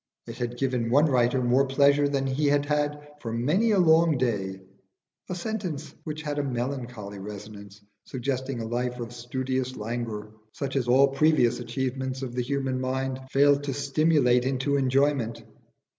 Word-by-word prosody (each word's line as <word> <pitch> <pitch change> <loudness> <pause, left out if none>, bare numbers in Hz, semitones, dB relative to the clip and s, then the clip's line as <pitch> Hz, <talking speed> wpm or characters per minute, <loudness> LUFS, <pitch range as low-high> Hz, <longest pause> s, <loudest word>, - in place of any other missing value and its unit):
It - - -9
had 120 0 -3
given 125 -3 0
one 145 +6 +5
writer 125 -2 +2
more 130 +3 +3
pleasure 140 +1 +4
than 140 -1 0
he 135 +3 0
had 145 0 +2
had 150 0 -1
for 115 -5 -5
many 150 - +1
a 210 - +3
long 165 -3 +5
day 100 -6 -1 0.7
a 180 - -2
sentence 180 -6 -4
which 155 0 -5
had 145 -1 -2
a - - 0
melancholy 120 -5 -4
resonance, 100 0 -9 0.3
suggesting 130 0 -3
a - - -4
life 125 +1 -2
of 120 0 -6
studious 130 +1 -3
languor 110 -1 -4 0.2
such 140 -1 -4
as 130 -3 0
all 135 +3 +5
previous 135 -3 +3
achievements 130 +2 -3
of 125 -2 -5
the 125 - -1
human 130 0 -2
mind 130 0 -2
failed 145 +1 +4
to 135 -2 -2
stimulate 140 -3 +3
into 135 +2 0
enjoyment. 135 -3 +1
130 Hz, 160 wpm, -26 LUFS, 120-145 Hz, 0.7 s, one